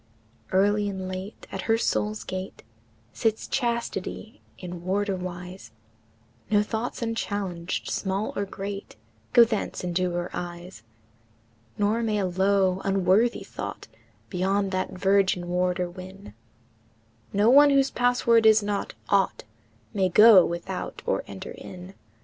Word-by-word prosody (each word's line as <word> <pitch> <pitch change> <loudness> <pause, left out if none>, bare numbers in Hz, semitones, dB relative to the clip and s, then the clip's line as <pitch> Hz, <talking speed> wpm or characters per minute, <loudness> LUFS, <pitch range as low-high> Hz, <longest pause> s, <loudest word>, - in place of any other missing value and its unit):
VI. 185 - +1
Early 205 +1 +2
and 190 -1 -5
late, 185 +2 -7
at - - -4
her 225 - +5
soul's 215 -1 -1
gate, 185 +1 -6 0.5
Sits 220 -1 -1
Chastity 235 -4 -3 0.2
in 175 -1 -7
warderwise, 185 -1 -3 0.8
No 210 -1 +4
thoughts 225 +3 -4
unchallenged, 200 -6 -3
small 195 +2 -2
or 200 - -1
great, 195 +1 -7 0.4
Go 235 - +8
thence 220 -5 -2
into 180 +1 0
her 175 0 -3
eyes; 175 +1 -7 1.0
Nor 210 +3 +1
may 220 -2 0
a 200 - 0
low, 190 0 +2
unworthy 195 +4 +2
thought - - -7 0.4
Beyond 195 +1 0
that 185 0 -1
virgin 190 -1 +2
warder 180 0 0
win, 185 - -11 1.0
Nor 205 +4 +4
one, 290 +1 +8
whose 275 -1 +3
password 240 -2 +3
is 215 -1 +6
not 205 -1 -3
"ought," 200 -1 +2 0.5
May 190 -2 +1
go 210 0 +8
without 170 +3 -5
or - - 0
enter - - -8
in. 180 +1 -10
195 Hz, 125 wpm, -26 LUFS, 185-215 Hz, 1.0 s, Go